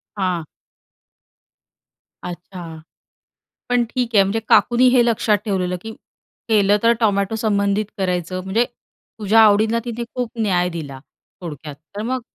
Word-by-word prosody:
हां. 185 -5 -2 1.8
अच्छा. 175 -2 -8 0.9
पण 245 -1 +2
ठीक 245 -2 -2
आहे 200 - +7
म्हणजे 205 +4 -1
काकूनी 245 +1 +4
हे 245 -1 +4
लक्षात 220 -2 +2
ठेवलेलं, 185 -4 -1
की 220 0 -7 0.6
केलं 205 -2 +4
तर 230 0 +5
टोमॅटो 200 -1 +1
संबंधित 205 -1 +1
करायचं 185 -1 -2
म्हणजे 210 +5 +1 0.5
तुझ्या 215 +2 +4
आवडींना 220 +1 +4
तिने 235 0 -4
खूप 245 -3 -3
न्याय 180 -4 +1
दिला 145 -6 -7 0.4
थोडक्यात 150 -4 -7 0.2
तर 205 - -4
मग 255 +3 -2
205 Hz, 125 wpm, -20 LUFS, 180-225 Hz, 1.8 s, आहे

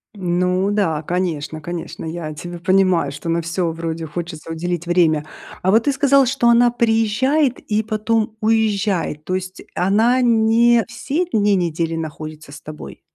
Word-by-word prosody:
Ну 180 +1 0
да, 165 -7 0
конечно, 160 -3 -3
конечно, 170 +2 -6
я 160 -1 -5
тебя 175 +3 -7
понимаю, 185 -4 +2
что 145 +4 -6
на 170 +1 +1
всё 170 +1 -2
вроде 165 0 -4
хочется 165 0 -6
уделить 170 +1 -3
время. 165 -4 +2 0.4
А 185 - 0
вот 220 +2 +4
ты 285 - +2
сказал, 275 0 +4
что 245 -1 +2
она 240 +1 +5
приезжает 240 +4 +1
и 215 0 -1
потом 220 +1 -1
уезжает. 210 -7 0
То 185 - -2
есть 185 0 -5
она 220 +7 +3
не 230 0 +4
все 285 +9 -2
дни 205 - +2
недели 165 -2 -1
находится 155 -1 -7
с 145 - -10
тобой? 155 0 -10
185 Hz, 155 wpm, -20 LUFS, 165-225 Hz, 0.4 s, она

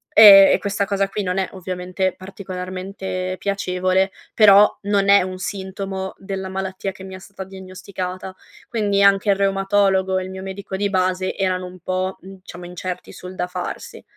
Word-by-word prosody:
e 200 -2 +10
e - - +4
questa 200 0 -1
cosa 195 0 0
qui 205 0 -3
non 180 +1 -1
è, 190 - -1
ovviamente, 185 0 -3
particolarmente 185 0 -6
piacevole, 190 -1 0 0.2
però 210 -1 +7
non 200 -1 +1
è 200 -2 +7
un 185 0 -6
sintomo 190 -1 -5
della 190 -1 -5
malattia 190 +1 -4
che 190 - -13
mi 190 0 -8
ha - - -9
stata 195 0 -9
diagnosticata. 185 0 -7 0.3
Quindi, 205 -3 +1
anche 200 +1 +4
il - - +3
reumatologo 195 -1 +1
e - - -4
il 185 - -7
mio 190 0 -7
medico 190 0 -6
di 200 +1 0
base 185 0 0
erano 185 -1 -1
un 180 0 -11
po', 185 +2 -2
mhmm, 195 0 -12
diciamo 175 0 -10
incerti 180 +1 -6
sul 180 +1 -10
da 180 - -2
farsi. 460 - -6
190 Hz, 175 wpm, -21 LUFS, 185-195 Hz, 0.3 s, e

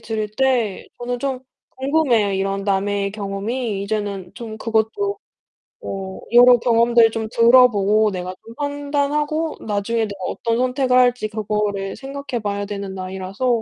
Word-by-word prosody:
들을 215 -2 -3
때 250 -7 +1
저는 245 0 -3
좀 270 -2 -2 0.4
궁금해요, 260 -7 +2
이런 195 +1 -1
남의 200 0 0
경험이. 205 +2 -3
이제는 200 -3 -3
좀 220 -2 -8
그것도 225 - -1 0.6
뭐 190 -1 -6
여러 245 +1 +8
경험들 235 -1 +4
좀 220 0 -3
들어보고 220 -4 +5
내가 185 0 -5
좀 230 - -12
판단하고 290 +2 -1
나중에 215 +2 -1
내가 200 -3 -4
어떤 230 +3 -1
선택을 255 0 +2
할지 245 -3 +3
그거를 210 -2 -2
생각해 275 -3 -5
봐야 205 0 -2
되는 200 -1 -5
나이라서 190 +5 -4
220 Hz, 300 characters per minute, -21 LUFS, 200-250 Hz, 0.6 s, 여러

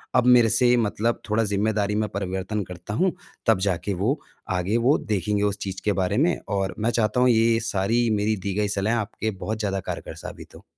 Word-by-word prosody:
अब 125 -1 +4
मेरे 120 -2 +6
से 125 +2 +4
मतलब 115 +1 0
थोड़ा 110 +2 +2
ज़िम्मेदारी 105 0 0
में 110 0 0
परिवर्तन 95 +2 -3
करता 90 +2 -8
हूँ, 180 - +2 0.3
तब 115 -5 +4
जाके 95 +2 -1
वो 110 - 0 0.4
आगे 95 +6 0
वो 125 +6 +3
देखेंगे 105 -1 -1
उस 100 0 0
चीज़ 95 -1 -4
के 105 - +3
बारे 95 +3 0
में। 165 +6 +3
और 100 -1 -1
मैं 110 +2 +1
चाहता 115 0 +1
हूँ 125 - +5
ये 115 -1 +4
सारी 115 +3 +1
मेरी 105 +1 +1
दी 100 0 -4
गई 105 0 +1
सलाहें 105 +3 0
आपके 110 0 -3
बहुत 105 +2 -4
ज़्यादा 100 -2 -1
कारगर - - -6
साबित - - -10
हो। - - -14
105 Hz, 205 wpm, -24 LUFS, 100-115 Hz, 0.4 s, मेरे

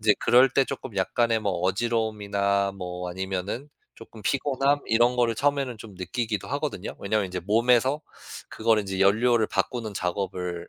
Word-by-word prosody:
인제 105 -1 +4
그럴 125 +3 +6
때 135 +2 +3
쪼끔 110 -5 -7
약간의 115 +4 +1
뭐 100 -3 -1
어지러움이나 100 -1 0
뭐 90 -2 -6
아니면은 95 +8 -4 0.3
쪼끔 115 -1 -13
피곤함 140 +2 +1
이런 120 +2 +3
거를 120 -2 +2
처음에는 140 -2 0
좀 105 -2 -11
느끼기도 110 +3 -3
하거든요. 140 -9 -3
왜냐하면 100 0 0
인제 90 0 -5
몸에서 120 - +2 0.5
그거를 110 -1 +1
이제 95 -1 -4
연료를 110 +3 +3
바꾸는 115 -5 -2
작업을 90 -2 -3
110 Hz, 375 characters per minute, -26 LUFS, 95-120 Hz, 0.5 s, 그럴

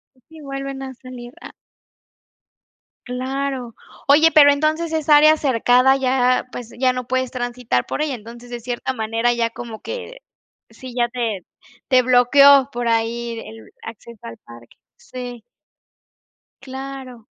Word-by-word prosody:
Así 310 +5 -17
vuelven 275 -1 -6
a 265 0 -7
salir. 250 -1 -11
Ah. - - -11 1.5
Claro. 260 -1 -4 0.3
Oye, 310 +3 +6
pero 290 -2 +8
entonces 310 +3 -1
esa 305 -1 +4
área 310 +1 +6
cercada 260 -1 +3
ya, 255 -1 +1
pues, 240 -2 -8
ya 255 -1 +3
no 250 -1 -5
puedes 260 0 -2
transitar 245 - -2
por - - -4
ella, 300 -3 -1
entonces, 235 +2 -12
de 240 -1 -7
cierta 245 +2 -4
manera 225 +1 0
ya 235 -1 0
como 230 -1 -9
que 485 +1 -7 0.5
sí, 245 +3 -11
ya 240 -1 +1
te 230 -7 -3 0.4
te 255 -2 +5
bloqueó 265 +2 +5
por 240 -2 -3
ahí 230 0 -1
el 110 - -12
acceso 230 0 -11
al 115 - -9
parque. 120 0 -15 0.2
Sí. 245 -2 -9 1.2
Claro. 265 -3 -9
250 Hz, 140 wpm, -20 LUFS, 235-275 Hz, 1.5 s, pero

